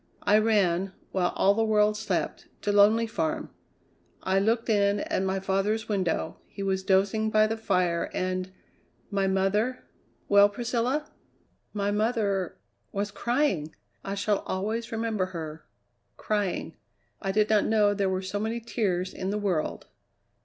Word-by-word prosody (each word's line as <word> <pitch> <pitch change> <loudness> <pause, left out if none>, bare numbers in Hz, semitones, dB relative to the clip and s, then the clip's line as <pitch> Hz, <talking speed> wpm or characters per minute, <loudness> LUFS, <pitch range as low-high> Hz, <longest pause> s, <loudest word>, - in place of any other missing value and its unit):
I 210 +1 +5
ran, 195 -4 +2 0.2
while 180 -2 +1
all 195 - +4
the 225 +2 +1
world 210 -1 +3
slept, 215 +1 -2 0.2
to 205 - +1
Lonely 210 +3 +5
Farm. 160 -8 -2 0.7
I 190 +1 +2
looked 225 +3 +1
in 205 -2 +2
at - - -1
my 190 0 0
father's 195 +4 0
window; 185 -6 -1
he 200 - -7
was 190 -1 0
dozing 195 +3 +2
by 215 0 +4
the 220 +1 -1
fire, 180 -6 0
and 185 0 -2 0.6
my 195 -1 +1
mother 200 +6 +1 0.2
" - - -39
"Well, 200 0 +6
Priscilla?" 245 +6 -1 0.6
"My 205 -1 -1
mother 210 -4 0 0.3
was 205 +1 -2
crying! 235 - 0 0.3
I 195 - -3
shall 200 0 +1
always 220 +5 -2
remember 225 -4 -1
her 155 -1 -7 0.5
crying. 205 -3 -2 0.4
I 195 - -1
did 210 +1 +2
not 210 -1 +4
know 210 -2 +3
there 200 -1 0
were 190 0 -1
so 190 +2 -3
many 225 +2 -2
tears 190 -6 -1
in 190 - -4
the 205 - -1
world!" 190 -7 -1
205 Hz, 150 wpm, -27 LUFS, 190-220 Hz, 0.7 s, Well